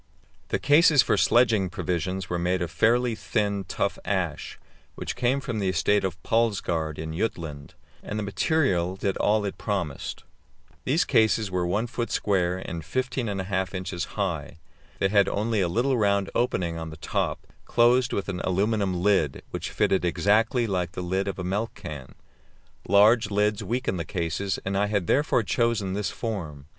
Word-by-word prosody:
The - - 0
cases 145 0 +5
for - - +2
sledging 115 -6 +3
provisions 90 +2 -2
were 90 -2 -2
made 90 +1 0
of 85 - -5
fairly 120 +4 +2
thin, 100 -2 -1
tough - - -2
ash, - - -2 0.4
which - - -5
came 125 +3 +1
from 120 -5 -4
the 95 -2 0
estate 100 +3 +2
of 95 -2 -2
Palsgaard 90 -9 0
in 80 0 -5
Jutland, 80 -8 -4 0.3
and 105 - -5
the 105 - -2
material 95 - +1
did 95 0 -1
all 105 0 +2
it 100 - -5
promised. 90 -9 -3 0.6
These - - +2
cases 110 -2 +2
were 90 -1 0
1 105 +6 0
foot 120 0 -3
square 90 -3 +1
and 85 -3 -6
15 130 - -2
1/2 95 -1 -2
inches 90 -2 -3
high. 85 -8 -2 0.4
They 95 - +1
had 100 -1 +4
only 110 0 0
a 90 - +2
little 120 +8 +1
round 100 -2 +1
opening 85 -8 0
on 80 0 -5
the 80 - -10
top, - - -2 0.2
closed 120 +1 +3
with 100 - -2
an 95 -3 -3
aluminium 95 -1 0
lid, 95 -9 +2
which - - -4
fitted 95 - +1
exactly 110 - +2
like 90 -4 -2
the 90 - -4
lid 95 +2 -1
of 100 - -3
a 90 - -4
milk 100 +6 -2
can. 75 -7 -8 0.7
Large 105 +4 +5
lids 105 +1 +1
weaken 115 -1 -1
the 85 - -2
cases, 90 +2 -2
and 95 +1 -1
I 100 +1 +2
had 100 -3 0
therefore 135 - +2
chosen 105 -1 0
this 105 0 -1
form. 80 - -5
100 Hz, 170 wpm, -26 LUFS, 90-110 Hz, 0.7 s, cases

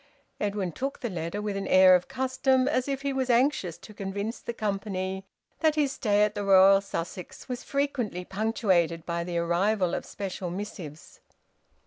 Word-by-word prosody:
Edwin 200 -3 -1
took 270 - -4
the 240 - -3
letter 170 +4 -4
with 205 -1 -2
an 195 - -3
air 185 0 +7
of 180 0 +3
custom, 260 0 +1
as 255 -1 0
if 275 0 -3
he 280 -1 -1
was 260 -1 -1
anxious 240 - +2
to 215 - -13
convince 200 +3 -4
the - - -5
company 195 -3 -3 0.3
that 315 -2 +3
his 290 -3 +2
stay 210 -5 +2
at 210 0 +1
the 205 - -3
Royal 195 0 +6
Sussex 180 -2 -6
was 250 -1 -5
frequently 255 -10 -2
punctuated 190 -6 0
by 170 0 -2
the 170 0 -3
arrival 180 +3 +1
of - - -2
special 190 -2 -5
missives. 175 -5 -8
200 Hz, 170 wpm, -27 LUFS, 185-245 Hz, 0.3 s, air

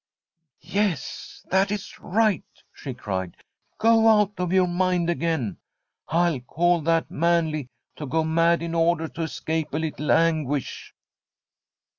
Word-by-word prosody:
* - - -51 0.2
Yes, 185 0 -3
that 190 +1 +3
is 205 -1 -5
right, 215 -1 +1 0.3
she 135 -4 -7
cried; 95 -7 -4 0.2
* - - -51
go 225 0 +4
out 210 -2 +5
of 180 -1 -1
your 185 -1 +4
mind 175 -1 +1
again. 160 - -1 0.5
I 165 -5 +1
call 175 +1 +2
that 165 +1 +1
manly 160 -4 0 0.3
to 150 - -6
go 160 +5 +1
mad 165 +1 +2
in 170 0 -4
order 165 -1 +2
to 165 - -7
escape 160 -1 -3
a - - +1
little 155 -1 -2
anguish.' 155 -5 0
165 Hz, 140 wpm, -24 LUFS, 155-180 Hz, 0.5 s, out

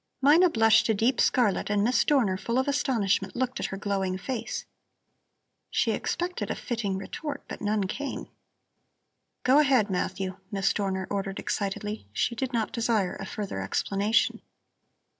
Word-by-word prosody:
Mina 315 +7 +6
blushed 225 -5 +4
a 220 - +3
deep 235 +5 +2
scarlet 215 -7 +2
and 205 -1 +2
Miss 245 +4 +3
Dorner, 245 -10 +2
full 235 +5 -2
of 260 - +1
astonishment, 210 -9 +1
looked 255 +1 -1
at - - -1
her 195 - -5
glowing 195 -2 -1
face. 240 +4 -4 1.0
She - - +1
expected 355 +1 -2
a - - -1
fitting 215 -5 -2
retort, 290 +10 -5
but - - -7
none 210 -1 +1
came. 280 +9 -4 1.2
"Go 265 +3 +5
ahead, 260 -8 +3
Matthew," 185 +1 -2
Miss 195 -1 +1
Dorner 190 -2 -1
ordered 195 -1 -2
excitedly. 210 - -3
She 235 - 0
did 260 +2 -3
not 230 -3 -1
desire 225 -5 0
a 195 - -6
further 195 - -4
explanation. 200 - +1
215 Hz, 150 wpm, -27 LUFS, 195-255 Hz, 1.2 s, Mina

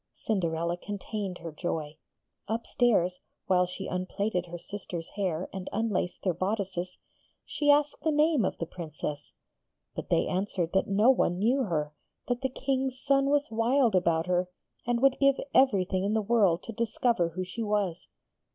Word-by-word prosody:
Cinderella 170 -4 -1
contained 200 -1 -5
her 165 - -7
joy. 155 -1 -4 0.5
Upstairs, 220 -5 +1 0.3
while 180 -1 +3
she 185 +2 -6
unplaited 185 0 -2
her 175 0 -6
sisters' 175 -2 -7
hair 185 -4 -1
and 190 -1 -5
unlaced 210 -5 -1
their 185 - +2
bodices, 185 -1 -2 0.5
she 290 - -1
asked 290 0 +4
the 320 - +1
name 300 -3 +3
of - - -1
the 165 - -3
Princess. 155 -3 -6 0.6
But - - -6
they - - +3
answered 185 -2 -1
that 190 - +2
no 210 +6 +5
one 175 -8 +1
knew 245 +7 +2
her; 150 -5 -2 0.3
that 245 0 -1
the 265 - 0
King's 265 0 -2
son 275 0 +2
was 290 -1 +1
wild 230 +1 +3
about 170 -3 +2
her, 180 0 0 0.4
and 240 -1 +1
would 270 -1 +4
give 275 -1 +4
everything 190 -7 +3
in 205 +2 0
the 220 - +2
world 200 -6 +3
to 230 - -7
discover 230 -4 +1
who 185 +3 -4
she 185 +6 -6
was. 205 -5 -1
195 Hz, 160 wpm, -29 LUFS, 180-235 Hz, 0.6 s, no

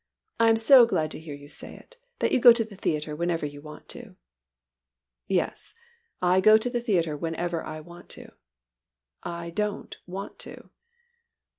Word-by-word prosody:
I 230 0 +5
am 225 - +5
so 235 +2 +7
glad 160 -8 -1
to - - -7
hear 155 -2 -8
you 145 0 -13
say - - -11
it, - - -17 0.2
that - - 0
you - - +3
go 240 -1 +9
to 230 -1 0
the 215 -2 -13
theatre 150 -5 -2
whenever 170 -1 -1
you 145 0 -8
want 150 0 -12
to." - - -9 1.1
"Yes, 190 - -2 0.5
I 180 +1 +4
go 215 +3 +7
to 245 +3 -3
the 240 -1 -1
theatre 170 -9 0
whenever 165 +2 -3
I 155 0 -7
want 175 +2 -14
to. - - -12 0.9
I 170 0 -6
don't 210 +3 -3
want 195 +3 -7
to." - - -11
175 Hz, 170 wpm, -26 LUFS, 155-215 Hz, 1.1 s, go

